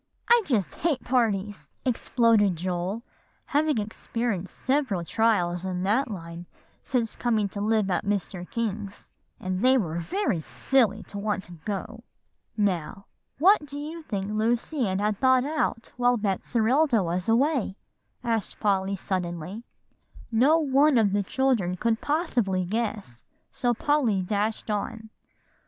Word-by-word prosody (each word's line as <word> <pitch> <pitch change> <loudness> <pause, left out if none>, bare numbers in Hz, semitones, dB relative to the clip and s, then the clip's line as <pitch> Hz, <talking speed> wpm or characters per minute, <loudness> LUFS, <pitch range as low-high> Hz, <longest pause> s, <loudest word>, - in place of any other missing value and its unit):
"I 475 0 +7
just 220 - 0
hate 305 -6 -1
parties!" 210 -5 0
exploded 230 -5 +3
Joel, 180 +5 -3 0.4
having 300 -1 +1
experienced 215 -2 -3
several 260 -11 0
trials 180 -5 +1
in 185 -1 -2
that 230 +8 +1
line 170 -3 -7 0.3
since 240 -4 -1
coming 220 -4 +1
to 200 - -5
live 215 -2 +1
at 175 - 0
Mr. 195 -3 -3
King's; 210 -3 -4 0.3
"and 185 0 -3
they 260 +1 +6
were 170 -7 -1
very 330 - -1
silly 215 - +1
to 200 - -8
want 205 -1 -1
to 175 - -13
go." 215 +3 -4 0.5
"Now, 195 -2 -1 0.3
what 370 +4 +5
do 285 +1 -6
you 315 +3 -6
think 200 -8 -4
Lucy 235 +4 0
Ann 190 0 -1
had 210 0 0
thought 260 -1 +4
out 295 -6 -2
while 245 0 +3
Betserilda 225 - +2
was 180 +3 -2
away?" 250 -3 +2 0.5
asked 225 -3 -2
Polly 195 -2 +1
suddenly. 180 +1 -4 0.7
No 265 +8 +5
one 285 -2 +4
of 205 -4 +3
the 205 - +2
children 200 -5 0
could 225 +3 0
possibly 240 - 0
guess, 205 - -3 0.3
so 245 -1 0
Polly 240 -8 +1
dashed 215 +3 -1
on. 220 +2 -4
215 Hz, 135 wpm, -26 LUFS, 190-250 Hz, 0.7 s, I